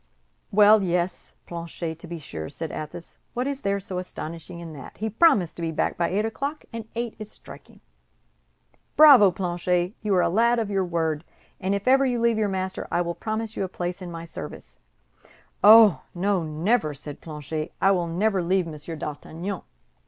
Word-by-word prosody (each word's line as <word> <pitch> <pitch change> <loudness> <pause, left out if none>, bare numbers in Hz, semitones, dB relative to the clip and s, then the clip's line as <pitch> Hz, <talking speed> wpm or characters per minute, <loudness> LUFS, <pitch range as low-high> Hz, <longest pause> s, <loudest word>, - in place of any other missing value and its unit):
"Well, 210 +1 +6
yes, 175 -1 -2
Planchet, 170 -1 -6
to 175 - -10
be 170 0 -6
sure," 80 - -7
said 165 - -6
Athos, 155 +2 -8 0.2
"what 250 +1 -1
is 280 0 -3
there 200 0 0
so 190 -2 -4
astonishing 170 -1 -7
in 165 -2 -8
that? 140 -3 -11
He 220 +1 -3
promised 210 - +3
to - - -6
be 165 - -1
back 160 - -1
by 170 - 0
eight 205 +3 0
o'clock, 280 +7 -4
and 225 -1 -6
eight 235 -1 -3
is 215 -1 -8
striking. - - -14 1.2
Bravo, 280 -10 +9
Planchet, 180 0 -1
you 210 -3 +1
are 180 - +4
a - - +3
lad 235 +6 +3
of 220 -3 -1
your 195 -2 +1
word, 160 -3 -1 0.4
and 195 +2 0
if 200 +3 -4
ever 270 +1 +6
you 250 -3 +1
leave 230 -1 +2
your 210 -2 +1
master, 190 0 -3
I 175 - +1
will 170 0 -2
promise 220 +4 -4
you - - -1
a - - -1
place 180 0 -4
in 180 - -6
my 165 -1 -7
service." 165 - -9 0.8
"Oh, 215 - +8
no, 190 +1 +1
never," 155 +1 0
said 145 +1 -9
Planchet, 155 0 -5
"I 195 - +4
will 175 -3 +1
never 190 +3 +1
leave 185 +1 +1
Monsieur 160 0 -7
d'Artagnan." 160 +6 -5
185 Hz, 190 wpm, -25 LUFS, 165-215 Hz, 1.2 s, Bravo